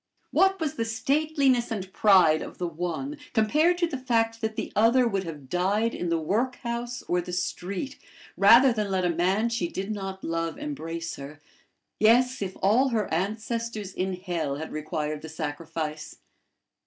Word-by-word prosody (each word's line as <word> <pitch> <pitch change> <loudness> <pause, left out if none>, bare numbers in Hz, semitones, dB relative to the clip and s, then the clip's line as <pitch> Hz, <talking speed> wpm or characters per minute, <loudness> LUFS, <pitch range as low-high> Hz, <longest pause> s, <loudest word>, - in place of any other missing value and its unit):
What 385 0 +3
was 310 -4 -2
the 230 - +1
stateliness 270 +2 +1
and 195 -4 -5
pride 180 -7 +5
of - - -8
the 180 - -2
one 180 - -4 0.2
compared 300 +10 +3
to 345 -1 +1
the 280 -5 -5
fact 225 -3 0
that 220 -1 -2
the - - -4
other 235 +3 +4
would 195 -4 -1
have 150 -5 -8
died 200 - +1
in 175 - -3
the 170 - +2
workhouse 235 +6 -2
or 180 0 0
the 175 - -7
street 185 +8 -3 0.4
rather 235 +6 +7
than 210 -3 -2
let 190 -1 0
a 175 - +2
man 190 +7 +1
she 230 -7 -1
did 195 +4 -4
not 195 -2 -5
love 165 0 -2
embrace 170 - -5
her 140 +2 -9 0.6
yes, 245 +3 +4
if 190 -1 -4
all 235 +8 +4
her 220 -7 -1
ancestors 215 +2 -2
in 190 +1 -2
hell 170 -6 -3
had 160 +2 -6
required 155 -1 -3
the 160 - -8
sacrifice! 155 0 -5
200 Hz, 165 wpm, -26 LUFS, 170-235 Hz, 0.6 s, rather